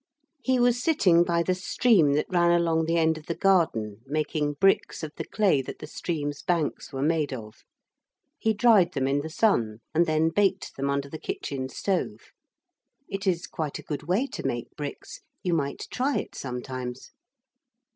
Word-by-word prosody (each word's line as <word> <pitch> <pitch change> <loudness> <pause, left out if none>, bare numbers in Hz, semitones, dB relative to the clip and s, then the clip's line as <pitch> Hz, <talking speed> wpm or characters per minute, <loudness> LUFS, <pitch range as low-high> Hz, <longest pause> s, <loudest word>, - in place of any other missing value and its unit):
He 260 -1 +1
was 245 0 +3
sitting 190 - +4
by 170 -1 +1
the 185 - +1
stream 180 - +3
that 150 - +1
ran 175 -1 +3
along 165 -2 +2
the 165 +1 +1
end 160 -1 +2
of 155 - -18
the 170 - -2
garden, 115 - +1
making 150 0 -1
bricks 195 +2 +2
of 155 -1 -5
the - - -4
clay 195 -10 +2
that 130 - -8
the - - -8
stream's 145 -4 -4
banks 170 -4 -1
were 135 -1 -3
made 155 -1 +1
of. 110 -4 -8 0.8
He 220 - +2
dried 205 -6 +5
them 135 -2 0
in 140 +1 +1
the 160 - -6
sun, 135 - +1 0.2
and 170 +2 +3
then 155 +1 +2
baked 195 +2 0
them 140 +1 -2
under 140 0 -1
the 155 +3 -8
kitchen 130 -2 -4
stove. 190 +6 -3 0.8
(It 195 0 -4
is 175 -2 +1
quite 155 -3 -4
a - - -10
good 145 -2 -4
way 195 +9 +2
to - - -7
make 120 0 -3
bricks 145 -1 -7 0.2
you 180 - 0
might 140 -4 -1
try 270 +3 0
it - - -4
sometimes.) 125 -1 -6
160 Hz, 180 wpm, -26 LUFS, 140-185 Hz, 0.8 s, dried